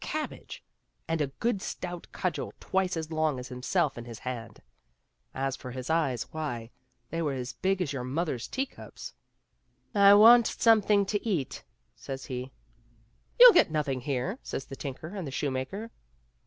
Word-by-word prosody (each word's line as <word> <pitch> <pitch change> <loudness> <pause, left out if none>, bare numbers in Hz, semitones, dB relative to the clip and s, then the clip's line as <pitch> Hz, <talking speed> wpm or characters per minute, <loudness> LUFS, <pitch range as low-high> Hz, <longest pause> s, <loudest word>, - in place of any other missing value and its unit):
cabbage, 310 0 -5 0.4
and 165 -1 0
a 145 - +1
good 205 - -2
stout 175 -2 -6
cudgel 185 -3 -3
twice 190 -2 0
as 160 0 -4
long 155 -3 +1
as 125 +1 -7
himself 135 +3 0
in 120 - -8
his 115 -2 -8
hand; 115 -3 -6 0.7
as 135 0 -2
for 130 - -9
his 130 +3 -5
eyes, 145 -7 +1
why, 120 -7 -4 0.4
they 165 - -2
were 150 -4 0
as 125 -1 -5
big 190 +8 0
as 145 - -4
your 130 -3 -3
mother's 135 -1 -2
teacups. 270 +1 -6 0.4
" - - -43
I 200 -1 +8
want 230 +2 +8
something 210 -3 +4
to 205 +1 -2
eat," 175 - -2 0.3
says 135 +2 -7
he, 130 -1 -5 0.4
" 115 - -37
You'll - - +11
get - - +5
nothing 145 -4 -1
here," 140 - -2
says - - -5
the 135 - -8
tinker 140 +3 -6
and 190 -4 -5
the - - -5
shoemaker. 145 - -3
150 Hz, 170 wpm, -29 LUFS, 130-190 Hz, 0.7 s, You'll